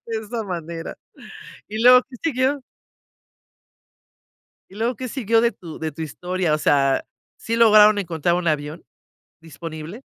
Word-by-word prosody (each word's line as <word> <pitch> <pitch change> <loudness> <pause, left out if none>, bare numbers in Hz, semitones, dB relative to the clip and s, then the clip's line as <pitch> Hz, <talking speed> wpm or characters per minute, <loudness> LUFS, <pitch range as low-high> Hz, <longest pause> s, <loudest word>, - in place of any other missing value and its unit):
de 225 -1 -3
esa 225 +1 -5
manera, 170 -3 -6 0.7
¿y 215 +1 -5
luego 250 +1 +8
qué 250 - -10
siguió? 275 -2 0 2.1
¿Y - - -14
luego 230 +4 -1
qué 255 +3 -6
siguió 230 -3 +1
de 235 0 +2
tu 165 -8 -11
de 160 -1 -3
tu 160 +3 -6
historia?, 175 +2 -2
o - - +2
sea, 135 -2 +2 0.3
¿sí 230 +1 -3
lograron 215 -2 +6
encontrar 170 -3 -1
un 180 -1 -2
avión 150 +1 -2 0.6
disponible? 165 - -9
185 Hz, 140 wpm, -22 LUFS, 160-230 Hz, 2.1 s, luego